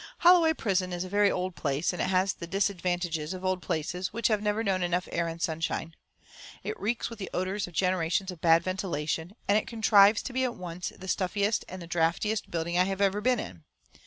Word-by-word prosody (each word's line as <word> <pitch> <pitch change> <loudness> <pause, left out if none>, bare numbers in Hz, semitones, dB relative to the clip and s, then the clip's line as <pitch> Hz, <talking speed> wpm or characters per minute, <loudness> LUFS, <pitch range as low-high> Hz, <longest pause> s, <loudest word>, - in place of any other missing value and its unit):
Holloway 340 -2 +6
Prison 190 -9 0
is 175 0 -2
a 185 - -7
very 205 +1 +4
old 185 -1 -2
place, 145 +4 -1
and 180 - -3
it - - 0
has 190 +1 +2
the 170 - -8
disadvantages 175 -4 -1
of 185 0 -7
old 185 -1 0
places 175 +2 -3
which 230 +2 0
have 215 -2 +1
never 210 +1 0
known 190 -3 0
enough 180 +1 0
air 170 - 0
and 165 0 -5
sunshine. 165 0 -2 0.7
It - - -4
reeks 225 +4 -2
with 230 - -9
the 190 - -5
odours 190 +2 -1
of 175 - -12
generations 185 +1 +1
of 175 - -11
bad 165 0 +5
ventilation, 175 -1 -3
and 205 +1 +4
it - - -8
contrives 220 -2 +5
to 255 - -6
be 260 +1 +1
at 250 -2 -1
once 180 0 -5
the 190 - -12
stuffiest 200 +3 0
and 185 -1 -7
the - - -10
draughtiest 175 +6 0
building 170 +1 -1
I 180 - +5
have 195 0 -3
ever 200 +1 +2
been 250 +1 +2
in. 85 - -7
185 Hz, 220 wpm, -28 LUFS, 170-205 Hz, 0.7 s, Holloway